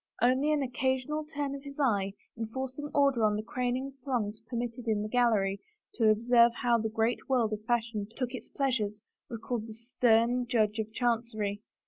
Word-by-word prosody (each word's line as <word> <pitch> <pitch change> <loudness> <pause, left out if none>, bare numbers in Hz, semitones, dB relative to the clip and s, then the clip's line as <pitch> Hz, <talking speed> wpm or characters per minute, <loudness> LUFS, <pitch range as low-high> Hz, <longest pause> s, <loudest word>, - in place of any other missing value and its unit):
Only 260 +5 +3
an 295 -2 +2
occasional 260 +4 -1
turn 290 -2 -3
of 280 - -6
his 280 +1 -10
eye, 200 -8 +1 0.2
enforcing 260 +5 -4
order 275 -5 +3
on 210 -1 +3
the 210 - -3
craning 250 +3 -2
throngs 225 -5 -2
permitted 240 0 -4
in 210 -2 +1
the - - -3
gallery 215 -5 +2 0.3
to 225 -3 +3
observe 235 +2 +5
how 240 -1 +4
the 220 0 -1
great 225 +4 -1
world 235 -5 +2
of 215 0 -5
fashion 225 -3 -1
took 255 -2 -2
its 250 - -7
pleas 270 -3 0
ures, 210 0 -4 0.3
recalled 230 -1 -4
the 220 - -9
stem 235 +1 +2
Judge 220 -2 +1
of 220 0 -3
Chancery. 220 -4 -1
235 Hz, 175 wpm, -30 LUFS, 220-255 Hz, 0.3 s, observe